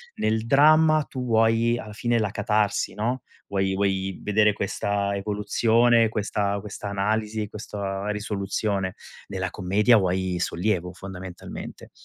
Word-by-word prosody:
nel 110 +1 0
dramma 155 +3 +5
tu 130 -2 -4
vuoi 115 +1 +3
alla 105 -1 -8
fine 120 +2 0
la 105 -2 0
catarsi, 105 -1 0
no, 115 +4 -2 0.3
vuoi 95 -1 0
vuoi 95 -1 -1
vedere 105 0 +3
questa 100 0 -1
evoluzione, 110 +3 +2
questa 100 -1 -1
questa 105 -1 -6
analisi, 105 +1 -1
questa 100 -1 -5
risoluzione. 100 -2 -2 0.3
Nella 95 -2 -3
commedia 105 +6 +3
vuoi 95 -1 0
sollievo, 90 0 -1
fondamentalmente. 95 -1 -9
105 Hz, 120 wpm, -25 LUFS, 95-110 Hz, 0.3 s, dramma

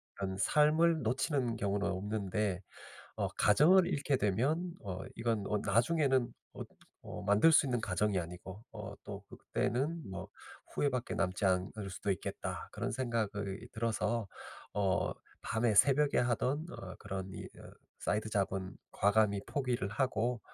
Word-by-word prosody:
그런 95 -1 -3
삶을 155 +6 +4
놓치는 125 +1 0
경우는 100 -1 0
없는데 100 0 -1 0.6
어 - - 0
가정을 170 - +5
잃게 145 -4 +1
되면 135 - +1
어 95 -2 -4 0.2
이건 115 -3 0
어 105 - +1
나중에는 125 +4 +2 0.2
어 - - -5 0.4
어 - - -6
만들 105 +10 +5
수 155 - +6
있는 125 -3 0
가정이 105 -1 +1
아니고 90 +4 -8
어 105 -1 -7
또 100 0 -7
그때는 145 +9 -1
뭐 95 - -6 0.5
후회밖에 130 -4 0
남지 95 0 0
않을 95 +2 0
수도 100 +2 -3
있겠다.' - - -5
그런 - - -3
생각이 110 -5 -2
들어서 115 -1 -1 0.5
어 95 -3 +1 0.3
밤에 110 -1 +1
새벽에 140 +6 +5
하던 125 +5 +1
어 95 - -8
그런 95 -2 -4
이 - - -6
으 - - -12 0.3
사이드 110 +1 -1
잡은 95 -2 -1 0.2
과감히 100 0 +3
포기를 125 -7 -1
하고 120 +2 0
110 Hz, 280 characters per minute, -33 LUFS, 100-130 Hz, 0.6 s, 수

